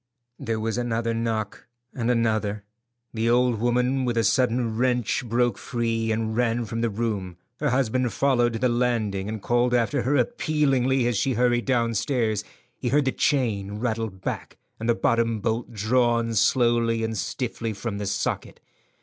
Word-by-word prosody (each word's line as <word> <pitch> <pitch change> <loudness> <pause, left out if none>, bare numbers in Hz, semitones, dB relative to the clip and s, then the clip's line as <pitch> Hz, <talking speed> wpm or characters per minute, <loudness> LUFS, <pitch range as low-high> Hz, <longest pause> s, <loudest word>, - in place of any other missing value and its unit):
There 115 -1 -2
was 110 +2 -1
another 115 -1 -1
knock, 115 -2 -3 0.3
and 120 -2 -2
another. 110 -3 0 0.5
The 115 0 0
old 120 -1 +3
woman 125 +3 +1
with 120 -2 -1
a 115 - +3
sudden 120 -2 +1
wrench 125 0 +1
broke 120 +1 0
free 115 -2 -1
and 110 0 -1
ran 120 0 +1
from 115 +2 -4
the 115 - +1
room. 100 -5 -3 0.2
Her 150 - +1
husband 125 -1 +1
followed 120 +2 +2
to - - -2
the 125 - +2
landing, 115 -5 0
and 110 -2 -5
called 120 +1 +2
after 120 +3 +1
her 135 +4 +1
appealingly 135 - +1
as 120 -3 +1
she 130 +6 +1
hurried 120 0 +2
downstairs. 115 -3 0 0.4
He 125 - -1
heard 145 +2 +3
the 130 - +2
chain 110 -10 0
rattle 115 -1 -1
back 95 -1 -6 0.2
and 115 +1 -3
the 120 - +4
bottom 115 +2 +1
bolt 115 +3 -2
drawn 115 +1 +1
slowly 115 0 +2
and 110 0 -2
stiffly 115 +1 -3
from 100 0 -4
the 100 - -3
socket. 100 0 -2
115 Hz, 165 wpm, -25 LUFS, 110-125 Hz, 0.5 s, the